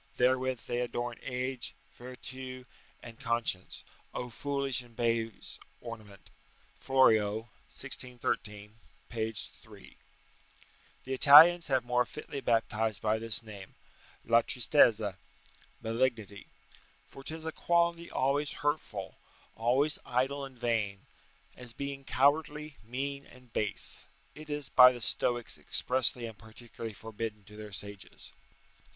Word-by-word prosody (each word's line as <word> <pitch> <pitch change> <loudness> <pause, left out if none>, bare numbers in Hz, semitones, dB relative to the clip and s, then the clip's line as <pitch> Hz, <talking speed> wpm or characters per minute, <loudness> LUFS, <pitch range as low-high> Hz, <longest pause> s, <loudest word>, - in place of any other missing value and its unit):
Therewith 130 0 +2
they 120 0 -3
adorne 120 -1 -3
age, 125 -1 -4 0.2
vertue, 130 +1 -9 0.4
and 115 -1 -11
conscience. 115 -5 -2 0.3
Oh 125 -1 -4
foolish 140 0 -2
and 120 -2 -18
base 115 -2 -2 0.2
ornament!" 110 -4 -11 0.5
Florio, 110 -6 +3 0.3
1613, 115 -6 -4 0.3
p. 110 -1 -2
3] 110 -2 -10 1.1
The 130 - -4
Italians 160 +6 +8
have 130 -3 +1
more 125 0 +1
fitly 145 -2 -7
baptized 110 -3 0
by 110 +2 0
this 115 0 0
name 100 -3 -11 0.5
[La 115 0 +5
tristezza] 115 -6 +3 0.7
malignity; 115 -3 -1 0.6
for - - -12
'tis 160 +3 -6
a 160 - -2
quality 170 0 +1
always 140 +2 0
hurtful, 110 -10 -3 0.4
always 130 +7 +4
idle 135 +3 -1
and 135 -2 -13
vain; 110 -3 -1 0.5
and 125 - -10
as 120 - -10
being 140 +1 -5
cowardly, 150 +2 +1
mean, 140 +4 -5
and 125 -2 -18
base, 125 +6 -1 0.3
it 155 0 -12
is 145 -1 -3
by 125 0 +8
the 125 - -7
Stoics 120 0 +2
expressly 125 -1 +1
and 110 -2 -9
particularly 115 0 -9
forbidden 110 0 -6
to 105 +2 -15
their 105 -1 -9
sages. 100 0 -8
120 Hz, 120 wpm, -31 LUFS, 110-135 Hz, 1.1 s, Italians